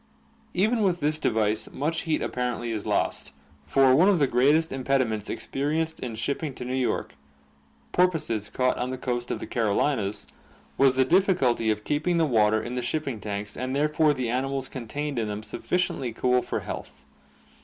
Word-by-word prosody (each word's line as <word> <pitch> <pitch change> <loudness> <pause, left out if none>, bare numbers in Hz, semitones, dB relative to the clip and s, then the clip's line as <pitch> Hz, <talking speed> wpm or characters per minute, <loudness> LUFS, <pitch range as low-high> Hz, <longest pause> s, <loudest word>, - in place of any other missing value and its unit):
Even 220 +5 +2
with 185 -4 +2
this 150 0 0
device 110 -3 0
much 160 +4 -1
heat 155 - +1
apparently 120 -1 -2
is 110 -2 -4
lost, - - -1 0.3
for 135 - +5
one 180 +8 +6
of 200 - +4
the 145 - +4
greatest 145 +6 +3
impediments 130 -5 0
experienced 160 +4 -2
in 120 -3 -5
shipping 140 +4 -3
to 125 - -6
New 125 - -3
York 130 -2 -1 0.8
porpoises 150 - +1
caught 125 +3 0
on 125 - -1
the 130 - -4
coast 120 -1 -3
of - - -1
the - - -5
Carolines 110 -1 0 0.5
was 135 -1 +4
the 130 0 +4
difficulty 160 - +3
of 105 -1 0
keeping 160 +6 0
the 165 - +3
water 110 -5 +3
in 120 - -5
the 125 - -1
shipping 135 -1 -2
tanks 105 0 -5
and 130 +1 -3
therefore 150 +1 +3
the 130 -2 -2
animals 135 +1 -1
contained 135 +3 -4
in 110 - -1
them 105 0 -4
sufficiently 135 -4 -2
cool 125 +2 +2
for - - -3
health. - - -8
130 Hz, 175 wpm, -26 LUFS, 115-150 Hz, 0.8 s, one